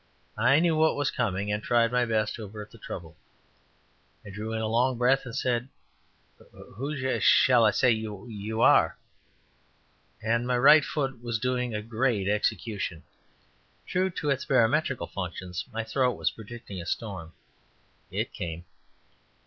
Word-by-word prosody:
I 130 +6 +5
knew 170 -1 +2
what 160 0 +3
was 145 -1 0
coming, 105 -3 -1
and 105 0 -1
tried 115 +1 +2
my 125 0 +2
best 110 -2 0
to 115 - -7
avert 105 +1 -9
the 115 - -15
trouble. 85 -5 -8 1.1
I 105 - -9
drew 105 +3 -5
in 110 - -2
a 110 - -1
long 120 +3 +1
breath 130 +3 +2
and 120 - -7
said: 125 -2 -1 1.0
"Who 140 +8 -4
sh 130 -1 -1
sh - - -1
sh - - +6
all 120 -2 +6
I - - +6
s - - -3
s - - 0
s - - -8
ay 130 - +6 0.2
y - - -6
y 105 +2 -10
y 105 -2 -7
ou 110 +1 -2
are?" - - +5 1.2
and 115 +2 0
my 125 -1 +1
right 150 +4 +7
foot 135 -5 -3
was 120 -1 -2
doing 125 -2 -1
great 115 -4 0
execution. 105 -4 -1 0.8
True 185 +1 0
to 150 -5 -2
its 135 0 -1
barometrical 130 +1 +2
functions, 90 -1 -5
my 115 0 -3
throat 125 +3 +1
was - - -1
predicting 110 -4 -9
a 85 - -9
storm. 95 -8 -4 0.8
It - - -3
came. 85 0 -5
115 Hz, 175 wpm, -27 LUFS, 105-130 Hz, 1.2 s, right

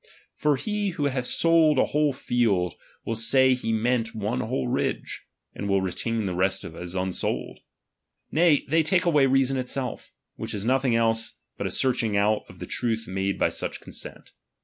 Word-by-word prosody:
For 150 -1 +1
he 205 +7 -2
who 150 -5 -2
hath 130 -3 -1
sold 165 -3 +4
a - - +4
whole 150 0 +1
field, 110 - 0 0.3
will 115 - -2
say 130 +4 +4
he 125 -3 -2
meant 115 +1 0
one 105 -11 -2
whole 65 0 -2
ridge; - - -2 0.3
and 100 - -4
will 100 0 +3
retain 110 +4 -2
the 95 - -2
rest 95 +2 +1
as 90 +2 -7
unsold. 95 0 -2 0.7
Nay, 160 -2 +4
they 165 +1 +3
take 175 +3 +2
away 150 -5 +4
reason 135 0 +2
itself; 130 -1 -4 0.3
which - - -5
is 100 0 -4
nothing 130 -1 +2
else 115 -1 +1 0.2
but - - -3
a - - -2
search 130 -1 +1
ing 110 -3 0
out 105 +1 +2
of - - -13
the - - -6
truth 115 -2 -2
made 95 +1 -1
by - - +2
such - - -4
consent. - - -8
120 Hz, 180 wpm, -26 LUFS, 100-135 Hz, 0.7 s, sold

